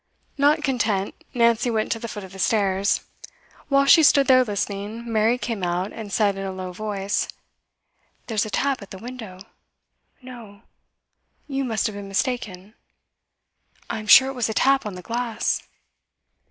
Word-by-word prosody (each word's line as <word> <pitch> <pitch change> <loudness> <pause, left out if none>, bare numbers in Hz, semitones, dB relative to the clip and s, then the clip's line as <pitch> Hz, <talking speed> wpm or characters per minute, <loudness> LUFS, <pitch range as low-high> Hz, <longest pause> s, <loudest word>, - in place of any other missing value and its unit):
Not 295 +2 +3
content, 220 -8 0 0.2
Nancy 235 0 +2
went 220 -2 -1
to 225 - -1
the 230 - -5
foot 210 -2 -7
of 190 - -11
the 195 - -11
stairs. 200 -1 +1 0.7
Whilst 275 0 +6
she 330 - +7
stood 285 -2 +5
there 255 -1 +6
listening, 205 +1 -4
Mary 220 +3 +3
came 230 -4 -4
out, 180 +2 -2
and 215 -3 -8
said 205 -1 +2
in - - -4
a 195 - -3
low 185 -1 -6
voice: 200 0 -2 1.0
'There's 220 -3 0
a - - -7
tap 270 +3 0
at 200 - -11
the 190 - -9
window.' 220 -5 -9 0.8
'No! 230 -5 -12 0.8
You 275 -1 -2
must 225 -4 -1
have 215 - -2
been 200 -1 -7
mistaken.' 195 -2 -3 1.2
'I'm 215 -1 -5
sure 260 +5 +8
it - - -5
was 245 -4 -1
a 220 - -3
tap 270 -3 +3
on 200 - -6
the 180 - -9
glass. 235 0 -2
220 Hz, 165 wpm, -23 LUFS, 200-250 Hz, 1.2 s, sure